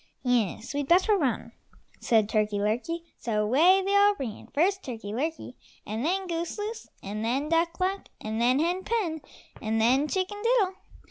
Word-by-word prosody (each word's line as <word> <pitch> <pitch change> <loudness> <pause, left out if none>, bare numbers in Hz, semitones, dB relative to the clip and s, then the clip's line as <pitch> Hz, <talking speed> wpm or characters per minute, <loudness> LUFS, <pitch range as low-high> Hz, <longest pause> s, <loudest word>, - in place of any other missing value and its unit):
"Yes, 240 -2 0
we'd 285 -1 -2
better 370 +6 +4
run," 280 -10 -1 0.5
said 220 -3 +3
Turkey 215 -1 0
lurkey, 245 +12 -1 0.2
so 215 -3 0
away 335 - +5
they 400 +1 +1
all 405 0 +5
ran, 230 -6 -6
first 385 +6 +1
Turkey 225 - -6
lurkey, 300 +2 -3 0.3
and 220 +3 -3
then 380 +5 0
Goose 335 +1 -3
loose, 435 +2 -5
and 210 +2 -4
then 265 +6 -1
Duck 335 +1 +1
luck, 380 +2 -1
and 220 +1 -3
then 250 +2 +4
Hen 350 +5 0
pen, 370 -9 -1 0.4
and 220 0 0
then 260 +6 +3
Chicken 380 +4 -2
diddle. 455 -5 +2
305 Hz, 165 wpm, -27 LUFS, 230-375 Hz, 0.5 s, away